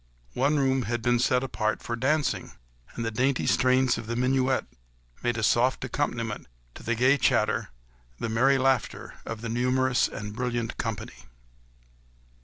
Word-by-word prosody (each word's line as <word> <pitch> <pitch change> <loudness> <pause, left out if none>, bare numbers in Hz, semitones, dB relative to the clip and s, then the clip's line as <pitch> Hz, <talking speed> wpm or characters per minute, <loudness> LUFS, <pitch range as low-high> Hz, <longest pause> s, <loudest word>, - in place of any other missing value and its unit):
One 140 +4 +2
room 135 -1 +2
had 120 -1 -2
been 120 0 +3
set 125 +1 +2
apart 110 -4 -2
for 120 - -3
dancing, 145 +5 0 0.4
and 115 - -3
the 115 - -1
dainty 130 +4 +1
strains 130 -1 +3
of 115 - -8
the 115 - -2
minuet 130 +1 +1 0.6
made 120 -1 0
a 110 - -2
soft 125 +4 +2
accompaniment 115 -5 -3 0.3
to - - -11
the 120 +2 -1
gay 130 +4 +4
chatter, 120 -6 +2 0.5
the - - -3
merry 130 +5 +3
laughter 130 -4 -1
of 115 -1 -5
the 115 - -4
numerous 125 +2 +2
and 105 -1 -7
brilliant 120 -1 -2
company. 110 - -5
125 Hz, 155 wpm, -27 LUFS, 115-130 Hz, 0.6 s, gay